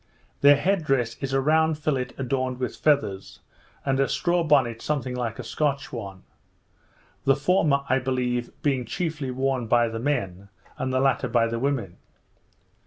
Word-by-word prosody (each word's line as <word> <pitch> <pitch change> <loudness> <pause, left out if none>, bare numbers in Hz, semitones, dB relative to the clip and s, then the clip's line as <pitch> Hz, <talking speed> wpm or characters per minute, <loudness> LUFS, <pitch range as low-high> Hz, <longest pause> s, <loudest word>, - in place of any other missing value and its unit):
Their 145 0 +8
headdress 140 - 0
is 135 -1 -3
a 135 - +2
round 160 +2 +2
fillet 140 -4 -1
adorned 130 -1 -1
with 125 - -3
feathers, 120 -11 0 0.5
and 135 -1 +1
a 135 - +2
straw 175 -1 +1
bonnet 130 -7 +2
something 135 -4 -2
like 120 -3 -3
a 125 - -6
Scotch 140 +3 -2
one; 100 -5 -7 1.0
the 135 - +4
former, 145 -2 +2
I 130 +1 +2
believe, 125 -2 -1
being 135 -4 +1
chiefly 150 +3 -3
worn 130 -1 -1
by 120 0 +3
the 115 0 -5
men, 100 -8 -2 0.3
and 130 - -1
the 130 - +1
latter 135 -1 +2
by 115 -2 +2
the 115 0 -2
women. 125 -9 -2
130 Hz, 160 wpm, -25 LUFS, 120-145 Hz, 1.0 s, Their